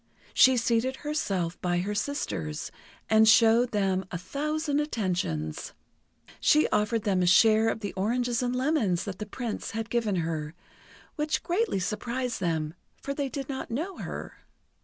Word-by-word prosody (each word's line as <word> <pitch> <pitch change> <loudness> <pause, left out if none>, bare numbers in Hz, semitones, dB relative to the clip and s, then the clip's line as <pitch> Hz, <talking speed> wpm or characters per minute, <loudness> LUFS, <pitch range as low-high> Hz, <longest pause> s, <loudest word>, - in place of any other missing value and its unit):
She 260 -1 +6
seated 235 +2 +1
herself 195 - -2
by 175 -1 0
her 205 +3 -2
sisters, 205 - -3 0.4
and 220 0 +5
showed 230 +2 +6
them 195 -3 0
a 175 - -4
thousand 295 - -2
attentions. 175 - -2 0.7
She 305 +1 +4
offered 210 +1 +1
them 190 -3 +1
a 180 - +2
share 220 +4 +5
of 225 - -3
the 205 -4 -4
oranges 235 +5 0
and 250 0 -1
lemons 255 - +1
that 195 -2 -6
the 210 - -5
Prince 230 +1 -4
had 225 0 -4
given 230 -4 +1
her, 160 -2 -3 0.6
which 300 0 -1
greatly 370 - 0
surprised 240 +5 -2
them, 160 -4 -1 0.3
for 280 - -4
they 280 -1 -2
did 275 -1 -5
not 270 -2 -5
know 325 +11 -3
her. - - -7
225 Hz, 155 wpm, -28 LUFS, 185-260 Hz, 0.7 s, She